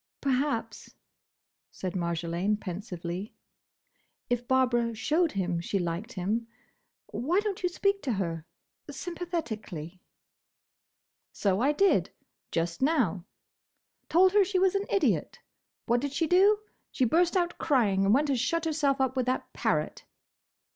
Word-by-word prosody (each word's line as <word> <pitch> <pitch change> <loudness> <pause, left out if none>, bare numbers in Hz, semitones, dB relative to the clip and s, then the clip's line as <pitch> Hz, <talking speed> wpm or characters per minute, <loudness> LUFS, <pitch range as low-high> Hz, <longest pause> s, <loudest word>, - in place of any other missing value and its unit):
"Perhaps," 275 -2 -2 0.7
said 185 -2 -5
Marjolaine, 170 +3 -1
pensively, 180 0 -6 1.0
"if 245 0 0
Barbara 240 -3 +2
showed 310 +9 +1
him 180 -3 -1
she 195 - -1
liked 180 +7 -3
him—Why 230 - -3
don't 415 -2 -3
you 360 - +1
speak 395 +2 0
to 255 - -1
her? 165 -4 -3 0.4
Sympathetically." 220 - -5 1.3
"So 195 -1 0
I 275 +4 +4
did, 390 +7 +3 0.4
just 170 +3 -2
now. 245 - +1 0.8
Told 370 +3 +5
her 410 -1 +6
she 380 0 -1
was 375 0 +3
an 400 +1 -1
idiot. 395 - +1 0.5
What 240 +1 +2
did 285 0 -3
she 325 +4 +1
do? 385 +6 +5 0.3
She 260 - +1
burst 345 +8 +3
out 345 -1 -1
crying, 215 -10 +2
and 195 - +3
went 285 +5 +3
and 260 - +1
shut 330 +7 0
herself 295 -4 +1
up 265 0 +1
with 255 -1 0
that 255 - -2
parrot." - - -1
250 Hz, 130 wpm, -28 LUFS, -, 1.3 s, her